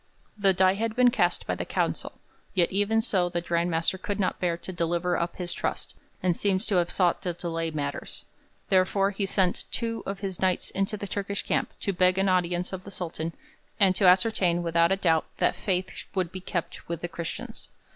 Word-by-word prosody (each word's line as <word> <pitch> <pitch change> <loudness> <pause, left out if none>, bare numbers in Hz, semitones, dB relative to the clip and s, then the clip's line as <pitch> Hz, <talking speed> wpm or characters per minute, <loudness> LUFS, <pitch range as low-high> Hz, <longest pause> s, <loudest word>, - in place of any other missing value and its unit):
The 200 -2 +3
die 185 0 +4
had 220 +2 -2
been 250 -1 +5
cast 265 - +1
by - - -1
the - - -3
council, - - -2 0.4
yet 175 -3 +3
even 205 +3 +2
so 190 -6 +1
the 175 - -1
Grand 170 0 0
Master 165 +3 0
could 205 +2 -3
not 185 - 0
bear 175 -2 0
to 185 +2 -7
deliver 175 +1 0
up 170 0 -2
his 175 -1 -4
trust, - - -3 0.3
and 180 -2 +3
seems 195 +2 +1
to 195 - +2
have 175 -1 +2
sought 180 0 +2
to 180 -2 -2
delay 165 -1 -3
matters. 145 -2 -5 0.4
Therefore 195 +1 +3
he 195 0 -2
sent 185 -2 +1
two 230 -2 -2
of 195 0 -4
his 190 -3 -3
Knights 185 -1 +1
into 195 +2 -1
the 200 - -5
Turkish 200 +1 -3
camp - - 0
to 200 - 0
beg 185 0 +3
an 195 0 +3
audience 180 0 +1
of 185 -1 -5
the - - -9
Sultan 165 -3 -4 0.5
and 190 -3 +5
to 190 - +4
ascertain 180 -2 +4
without 170 0 +3
a - - +5
doubt 165 -4 +2
that - - +2
faith 185 -1 -1 0.3
would 180 -3 0
be 185 - -7
kept 175 -2 -4
with 170 -1 -3
the 175 - -2
Christians. 170 -1 -6
185 Hz, 205 wpm, -27 LUFS, 170-195 Hz, 0.5 s, been